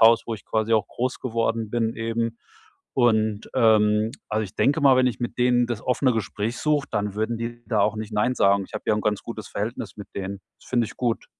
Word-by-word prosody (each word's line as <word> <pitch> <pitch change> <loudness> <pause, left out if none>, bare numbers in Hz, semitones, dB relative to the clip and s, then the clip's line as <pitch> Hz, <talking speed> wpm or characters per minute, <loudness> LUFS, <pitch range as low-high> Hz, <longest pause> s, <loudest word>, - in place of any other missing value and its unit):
Haus, 115 0 +6
wo 115 - -2
ich - - -12
quasi 110 +1 0
auch 105 -2 +2
groß 125 +1 -3
geworden 115 -2 -1
bin 115 -1 0
eben. 115 0 -2 0.6
Und, 110 -4 +2
ähm 110 -1 +4 0.2
also, 110 +1 0
ich 100 - -10
denke 145 +4 +2
mal, 135 -3 +6
wenn 130 - +4
ich 120 -5 -2
mit 120 0 -4
denen 125 0 +3
das 120 -3 -3
offene 130 0 +2
Gespräch 110 +1 -2
suche, 150 -2 +1
dann 105 -2 -1
würden 110 +2 -1
die 120 +1 -5
da 110 - +1
auch 105 - +2
nicht 110 0 -5
nein 105 +5 +1
sagen. 100 -2 +3
Ich - - -19
habe - - -4
ja - - +3
'n 105 - -1
ganz 105 -1 0
gutes 110 -3 -7
Verhältnis 110 +3 -4
mit 105 - -9
denen. 100 0 -4 0.2
Das - - -18
finde 120 -2 +2
ich - - -11
gut. 120 -2 -1
115 Hz, 230 wpm, -24 LUFS, 105-120 Hz, 0.6 s, Haus